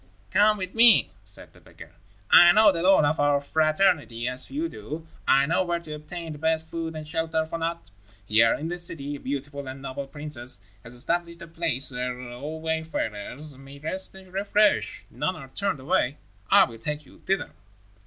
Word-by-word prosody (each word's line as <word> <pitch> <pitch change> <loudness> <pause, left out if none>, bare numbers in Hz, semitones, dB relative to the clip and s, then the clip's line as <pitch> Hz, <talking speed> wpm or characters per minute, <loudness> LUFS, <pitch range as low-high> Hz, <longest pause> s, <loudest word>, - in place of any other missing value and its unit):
"Come 210 +1 +4
with 185 -1 -5
me," 230 -1 +6
said 100 -1 -3
the - - -19
beggar. - - -14 0.4
"I 175 0 +9
know 215 0 +6
the 170 -3 -3
lore 185 -4 +5
of 145 +2 0
our 145 0 +3
fraternity 155 - +1
as 125 0 +2
few 310 +4 -3
do. 160 - -8 0.2
I 135 +1 +5
know 170 +5 +1
where 175 -1 -1
to 160 -2 -8
obtain 160 +2 -7
the 150 - -8
best 160 +1 0
food 165 -1 -4
and 155 -1 -7
shelter 160 0 -1
for 165 +1 -5
naught. 165 - -4 0.3
Here, 115 +2 +4
in 155 - -5
this 175 +1 -4
city, 145 -4 -3
a - - -8
beautiful 140 +1 -5
and 130 +1 -7
noble 135 0 -6
princess 135 -7 -1 0.2
has 120 +1 -5
established 170 +6 -2
a - - -10
place 165 -5 +1
where 125 0 -4
all 145 +6 -6
wayfarers 150 -4 -2
may 135 +1 -12
rest 185 +7 0
and 190 -1 -15
refresh. 205 +2 +1
None 185 - -2
are 135 - -10
turned 195 0 -2
away. 130 +1 0 0.3
I - - +7
will 115 -3 -5
take 150 +5 -4
you - - -18
thither." 195 0 -2
155 Hz, 190 wpm, -25 LUFS, 135-175 Hz, 0.4 s, I